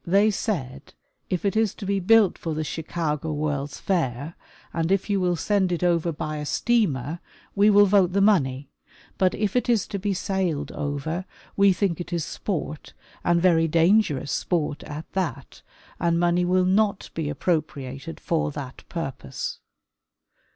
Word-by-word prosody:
They 200 +5 +4
said 145 - -4 0.3
if 185 +1 -2
it 200 - +1
is 220 -2 +1
to 205 - -7
be 200 0 +1
built 210 +1 +5
for 160 -2 -4
the 155 - -1
Chicago 160 -1 -3
World^s 145 -1 -2
Fair 150 -4 -1 0.4
and 165 +1 -1
if 195 +2 +1
you 200 - +2
will 180 -1 +1
send 190 +1 +1
it 175 0 -1
over 170 -1 +2
by 155 -1 -4
a 150 - -4
steamer, 165 - +1 0.3
we 205 +1 +4
will 205 0 +7
vote 190 -3 +3
the 200 - +2
money, 145 -9 +2 0.5
but 185 -1 +3
if 210 0 -1
it 245 - +1
is 230 -4 +3
to 200 - -3
be 200 0 -1
sailed 180 -6 -1
over, 145 +5 -3 0.3
we 200 0 +5
think 180 -2 0
it 175 - -8
is 170 -3 -1
sport 155 -6 -4 0.3
and 170 0 +2
very 165 -3 +4
dangerous 165 -3 +3
sport 150 -4 -1
at 150 +2 -6
that, 165 -8 -3 0.4
and 170 0 +2
money 175 +1 +2
will 185 +1 +3
not 200 +1 +1
be 160 -3 -2
appropriated 150 -2 -3
for 165 -2 0
that 140 -3 -8
purpose. 135 -5 -5
170 Hz, 165 wpm, -25 LUFS, 150-195 Hz, 0.5 s, will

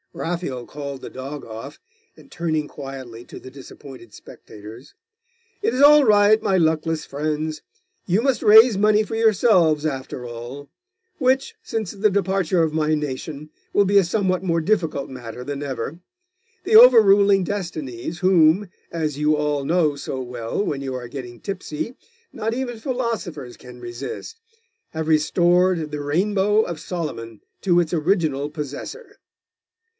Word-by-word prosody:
Raphael 165 -8 -4
called 140 -2 -7
the - - -8
dog 135 +3 -7
off, 115 +5 -9 0.4
and - - -17
turning 160 - -2
quietly 130 -5 -9
to - - -11
the 130 - -12
disappointed 130 -3 -13
spectators 110 +6 -13 0.7
'It 415 - 0
is 260 - 0
all 295 +1 +8
right, 210 -1 +5
my 190 - +1
luckless 160 -1 0
friends. 155 +1 -3 0.5
You 190 +4 +2
must 270 -2 0
raise 220 +1 +7
money 210 +1 +3
for 225 - -6
yourselves, 190 -8 +3
after 130 -3 -4
all; 120 +4 -8 0.5
which, 265 0 +1
since 220 -5 -3
the 210 +1 +1
departure 190 -3 +1
of 160 -1 -1
my 155 0 +1
nation, 150 +1 -5 0.2
will 205 - +4
be 200 +1 +3
a - - +3
somewhat 185 0 0
more 170 -3 +1
difficult 160 -6 -1
matter 125 -2 -8
than 140 +1 -5
ever. 135 +3 -5 0.7
The 435 - +2
over 480 - +10
ruling 200 -1 +4
destinies, 165 - -5
whom, 185 +1 +4 0.2
as 155 -4 -3
you 150 0 +2
all 150 -1 -1
know 160 -1 +1
so 135 -1 -5
well 120 - -4
when 140 -2 -3
you 135 -1 -4
are 125 -1 -6
getting 120 -2 -8
tipsy, 195 +3 -5 0.4
not 225 0 -2
even 245 -2 -4
philosophers 220 - -4
can 125 -1 -13
resist, 125 - -7 0.5
have 160 -1 -5
restored 170 +1 +2
the 150 -1 -4
Rainbow 200 +8 +1
of 170 -5 -6
Solomon 130 - -6 0.2
to 175 -3 +3
its 170 -1 -1
original 155 -4 0
possessor. 150 - -8
160 Hz, 150 wpm, -22 LUFS, 140-200 Hz, 0.7 s, over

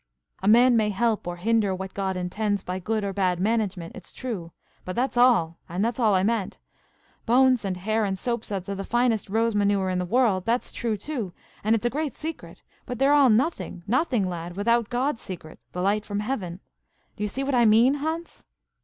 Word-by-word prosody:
"A 190 - -2
man 240 +3 +6
may 215 -2 +2
help 215 0 0
or 175 - -3
hinder 205 +1 +1
what 190 0 -6
God 190 -2 -2
intends, 200 +2 -1
by 180 +1 -4
good 215 +3 -1
or 200 -1 -2
bad 185 -3 +1
management, 195 -4 -1
it's 185 - -11
true; 205 -10 -5 0.3
but 185 - -5
that's 255 +2 0
all, 230 -10 +4
and 180 +5 -1
that's 235 +1 -2
all 215 -4 +4
I 185 - +2
meant. 215 -2 -1 0.7
Bones, 255 0 +4
and 190 -2 -2
hair, 215 +4 0
and 195 -2 -1
soap 235 +2 -2
suds 195 -3 -5
are 200 - -2
the 195 0 -4
finest 240 -2 +1
rose 225 +2 +1
manure 200 -2 +1
in 180 - 0
the 180 - -1
world, 220 -4 +2
that's 235 +5 -1
true 225 -3 -2
too, 220 - -5 0.3
and 220 +2 +3
it's 225 - -3
a - - +3
great 300 0 -2
secret; 320 +1 -7 0.2
but 250 - -4
they're 275 +3 +4
all 285 -3 +6
nothing–nothing, 235 - 0
lad!–without 200 +7 -1
God's 250 +1 -1
secret–the 175 -1 -9
light 205 +2 +1
from 205 -1 -3
heaven. 195 -6 -4 0.5
Do 210 - -5
you - - +1
see 265 +6 -3
what 275 0 -1
I 240 -2 +4
mean, 225 +5 +5
Hans?" 325 +2 -4
215 Hz, 200 wpm, -25 LUFS, 190-240 Hz, 0.7 s, man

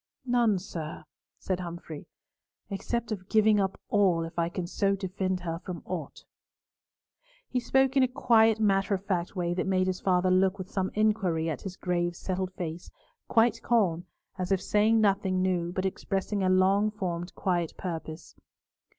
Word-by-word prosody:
"None, 240 -5 +3
sir," 165 -5 -6 0.3
said 185 -1 -2
Humfrey, 170 -3 -7 0.6
"except 235 +4 -3
of 185 -3 -5
giving 215 -1 +4
up 195 -1 -1
all 185 -5 +2
if 165 +1 -6
I 170 0 +1
can 175 0 -4
so 195 +3 +1
defend 190 -1 -2
her 165 -1 -3
from 180 -2 -7
aught." 180 -3 -6 1.2
He 255 - -1
spoke 265 +2 +2
in 270 - +5
a 255 - +5
quiet 225 -4 +4
matter 195 -1 +2
of 190 +1 -7
fact 185 -2 -2
way 175 -1 -1
that 180 +1 -2
made 185 -1 +2
his 185 0 -1
father 185 -1 +2
look 190 +1 +3
with 185 -1 -8
some 190 -1 -1
inquiry 195 -7 +1
at 150 - -5
his 190 -2 -7
grave 175 -1 -1
settled 185 +1 -3
face, 175 -2 -6 0.4
quite 230 +1 +3
calm, 185 -7 +1 0.3
as 185 +1 -2
if 195 - +3
saying 215 +4 +3
nothing 195 -2 +2
new, 175 -2 0
but 185 +1 -2
expressing 195 +1 -2
a 185 - +2
long 190 +3 +4
formed 180 -4 -4
quiet 175 -3 -1
purpose. 165 -2 -6
185 Hz, 165 wpm, -28 LUFS, 175-205 Hz, 1.2 s, in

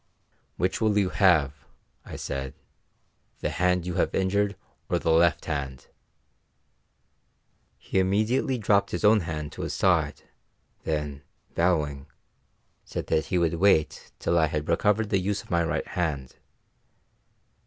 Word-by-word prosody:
"Which 90 +5 -1
will 110 -2 +2
you 100 -3 +2
have," 80 -10 +3 0.5
I - - -8
said, 65 0 -5 0.9
"the - - -1
hand 90 -1 +1
you 90 - -3
have - - -1
injured 100 +2 +1 0.3
or - - +2
the 80 - 0
left 85 0 +3
hand?" 70 -4 -4 1.9
He 95 - -1
immediately 110 +7 +1
dropped 100 -2 +2
his 85 - -2
own 105 +1 +6
hand 75 -4 -5
to - - -8
his - - -3
side, - - +1 0.6
then, 75 -3 -3 0.3
bowing, 75 -5 0 0.8
said - - -6
he 85 +3 +1
would 85 -1 +1
wait 85 -3 +2
till 85 0 +1
I 80 - +3
had 75 0 -3
recovered 105 +5 +1
the 100 - +3
use 100 +2 -2
of - - -16
my 85 -1 +2
right 80 -1 -1
hand. 75 -8 -3
85 Hz, 135 wpm, -26 LUFS, 75-100 Hz, 1.9 s, own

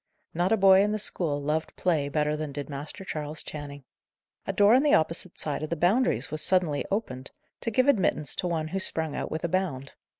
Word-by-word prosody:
Not 175 +3 0
a 225 - +4
boy 195 -1 +6
in 210 +1 +1
the - - 0
school 165 -8 0
loved 150 +2 -2
play 155 -6 0
better 150 0 0
than 150 -1 -4
did 145 +1 -6
Master 150 +7 -6
Charles 150 -2 -4
Channing. 145 -2 -8 0.6
A - - +1
door 205 +2 +5
on 255 - +6
the 295 0 +4
opposite 165 +2 0
side 150 -1 -2
of 155 - -4
the 170 - -1
Boundaries 175 - +1
was 155 0 -1
suddenly 175 -6 +2
opened, 135 - -2 0.3
to - - -2
give 255 +4 +2
admittance 185 - +1
to 180 - -1
one 160 -2 -2
who 195 - -2
sprung 160 -5 0
out - - -3
with 160 - -4
a - - +1
bound. 160 -7 -2
160 Hz, 220 wpm, -27 LUFS, 150-190 Hz, 0.6 s, boy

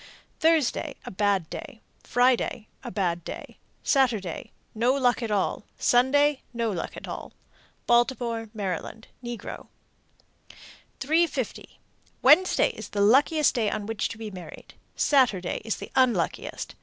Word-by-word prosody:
Thursday 315 -2 +2
a - - -6
bad 195 -3 +1
day. 225 - -8 0.2
Friday 245 -3 +1 0.2
a - - -5
bad 175 -3 -1
day. - - -8 0.2
Saturday 225 - 0 0.2
no 240 +4 +2
luck 250 -3 +2
at 230 - -3
all. 205 0 0
Sunday 275 +3 +3
no 230 -2 0
luck 180 - -5
at - - -8
all. - - -7 0.5
Baltimore, 240 -1 +1
Md. 200 +3 -4 0.2
(negro). 240 -2 -7 1.3
350. 320 +5 -1 0.4
Wednesday 370 0 +5
is - - -9
the 205 - -1
luckiest 280 +8 +4
day 225 -5 +1
on 205 - -3
which 225 0 -2
to 225 - -7
be 220 -1 -6
married. 180 -2 -11 0.2
Saturday 235 -11 +2
is 220 - -2
the - - -9
unluckiest. 255 -3 0
235 Hz, 130 wpm, -26 LUFS, 205-265 Hz, 1.3 s, Wednesday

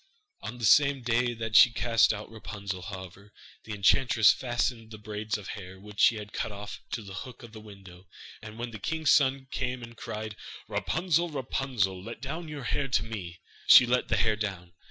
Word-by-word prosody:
On 110 +3 -7
the 120 - -2
same 140 +3 +5
day 120 0 +1
that 115 -1 -4
she 120 - +9
cast 115 -1 +3
out 105 0 -6
Rapunzel, 100 -4 -6
however, 95 +1 -9 0.3
the 110 - -6
enchantress 110 +2 +4
fastened 120 -2 -2
the 110 - -9
braids 105 0 -4
of 100 -3 -10
hair, 95 -2 -8
which 105 +1 -12
she 115 - +6
had 105 -1 -8
cut - - -3
off, 105 0 -8
to 115 - -3
the 100 -1 -10
hook 125 +5 -8
of 115 - -11
the 110 -1 -11
window, 95 -3 -14 0.3
and 105 +1 -10
when 120 0 -5
the 110 - -8
king's 160 +5 0
son 135 -1 +3
came 125 -2 -3
and 115 0 -10
cried: 110 -1 -6 0.3
'Rapunzel, 175 0 0
Rapunzel, 125 - -2
Let 115 +2 -8
down 155 +6 -5
your 150 -3 -7
hair 135 +3 -1
to 115 -7 +1
me.' 95 -7 -7 0.3
she 125 - +10
let 125 +1 +1
the 95 - +1
hair 110 +2 +2
down. 95 -5 -5
110 Hz, 195 wpm, -28 LUFS, 100-125 Hz, 0.3 s, she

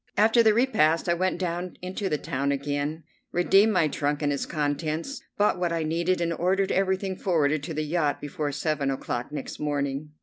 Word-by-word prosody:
After 220 +3 +5
the 220 -2 +4
repast 165 -11 +3
I 170 - +3
went 185 +1 0
down 175 0 -3
into 190 +2 -3
the 150 - +1
town 140 0 -2
again, 145 +3 -2 0.3
redeemed 195 +5 +4
my 180 -6 +3
trunk 145 +1 -1
and 145 0 +2
its 140 - -3
contents, 155 - -2 0.2
bought 205 -3 +2
what 175 -1 0
I 165 -1 0
needed, 170 +3 0
and 170 0 0
ordered 190 +3 +1
everything 190 0 0
forwarded 155 -6 +1
to 155 +3 -5
the 155 - -1
yacht 150 -2 0
before 145 0 -3
seven 145 -1 -1
o'clock 125 -2 -3
next 150 - -6
morning. 145 0 -2
160 Hz, 190 wpm, -26 LUFS, 145-185 Hz, 0.3 s, After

